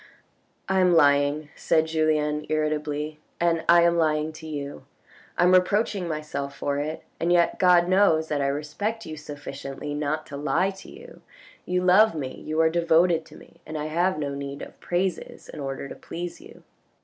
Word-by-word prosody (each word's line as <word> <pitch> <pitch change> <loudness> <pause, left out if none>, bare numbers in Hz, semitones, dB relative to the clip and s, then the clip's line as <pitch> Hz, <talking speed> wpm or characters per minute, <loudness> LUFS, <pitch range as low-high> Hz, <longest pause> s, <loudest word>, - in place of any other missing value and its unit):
" - - -42
I 190 0 +2
am 180 -2 +4
lying," 145 0 +3
said 160 -1 +2
Julien 155 -1 0
irritably, 150 0 -2
" - - -41
and 170 -1 +1
I 170 0 +7
am 170 0 +3
lying 155 -1 +1
to 160 0 -10
you. 145 -2 -6 0.5
I - - +3
am 180 +1 +5
reproaching 190 0 +2
myself 150 -3 -4
for 140 0 -1
it, 155 +2 -4 0.2
and 170 +2 0
yet 175 -1 +3
God 180 -1 +5
knows 185 -4 +3
that 145 -2 -1
I 140 - +1
respect 155 +11 -3
you 155 - -6
sufficiently 145 -1 -7
not 150 +1 -2
to 140 -2 -8
lie 170 +6 +1
to 190 - -13
you. 485 +1 -13 0.5
You 180 0 0
love 195 +3 +5
me, 135 -4 -4
you 155 +1 -2
are 160 - +4
devoted 170 0 +3
to - - -15
me, - - -18
and 155 - -6
I 150 - -3
have 180 +1 +1
no 145 -2 -3
need 140 0 -6
of - - -12
praises 180 0 -3
in - - -9
order 135 0 -4
to - - -8
please 175 +1 -7
you." - - -15
155 Hz, 190 wpm, -25 LUFS, 150-175 Hz, 0.5 s, I